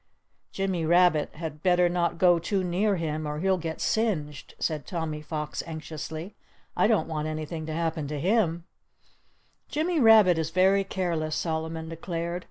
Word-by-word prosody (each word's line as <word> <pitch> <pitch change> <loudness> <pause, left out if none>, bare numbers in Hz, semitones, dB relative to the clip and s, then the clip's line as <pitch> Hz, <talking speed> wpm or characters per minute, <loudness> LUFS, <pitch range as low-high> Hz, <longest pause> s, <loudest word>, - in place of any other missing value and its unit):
"Jimmy 190 -3 -1
Rabbit 170 -2 +3
had 155 -2 -6
better 180 0 +4
not 175 -1 0
go 175 -1 +5
too 190 +3 -1
near 190 +4 +1
him, 155 -3 -3
or 150 0 -3
he'll 190 +3 +1
get 160 -1 -5
singed," 160 -11 -1
said 155 -4 -2
Tommy 160 -3 -3
Fox, 150 0 -4
anxiously. 160 +3 -6 0.4
"I - - +3
don't 215 -9 +2
want 155 -1 -3
anything 155 +1 -5
to 160 - -3
happen 160 -2 -2
to 150 0 -4
him." 175 -2 +1 1.1
"Jimmy 320 +2 0
Rabbit 215 - +6
is 160 -1 -1
very 190 +3 +3
careless," 170 -5 -2
Solomon 160 0 -3
declared. 170 +1 -4
165 Hz, 155 wpm, -27 LUFS, 155-185 Hz, 1.1 s, Rabbit